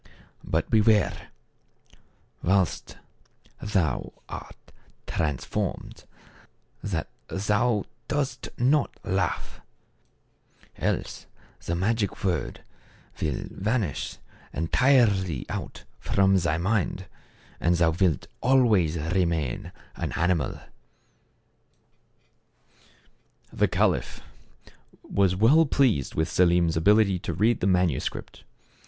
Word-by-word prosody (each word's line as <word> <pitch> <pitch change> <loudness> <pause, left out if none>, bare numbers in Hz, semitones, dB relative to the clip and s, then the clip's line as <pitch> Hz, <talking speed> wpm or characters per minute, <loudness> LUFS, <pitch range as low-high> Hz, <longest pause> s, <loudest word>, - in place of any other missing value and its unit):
"But, - - -1
beware, 110 -2 +3 1.1
while 95 0 +3 0.9
thou 90 - -1
art - - -10 0.3
transformed, 75 -6 -3 0.8
that 85 -6 -3 0.2
thou 105 +2 +1 0.2
dost 145 -2 -2
not 135 +4 +1
laugh; 95 -4 -2 1.2
else - - -3 0.4
the 85 - -2
magic 105 +3 -1
word 90 -6 -2 0.6
will 75 -4 -1
vanish 105 - -2 0.4
entirely 95 - +2
out - - -6 0.2
from 95 0 +2
thy 85 -4 +1
mind, 95 0 -1 0.5
and 85 +1 +2
thou 85 -1 +3
wilt 85 -3 +1 0.2
always 110 -11 +3
remain 80 -4 -1 0.2
an - - -4
animal." 85 -5 0 2.9
The - - +2
caliph - - 0 0.8
was 95 -2 +1
well 140 - +5
pleased 125 - +1
with 80 +1 +1
Selim's 85 -1 +3
ability 100 +2 +4
to 85 - -4
read 110 +6 +2
the 95 - 0
manuscript. 90 -7 -1
95 Hz, 85 wpm, -26 LUFS, 85-110 Hz, 2.9 s, well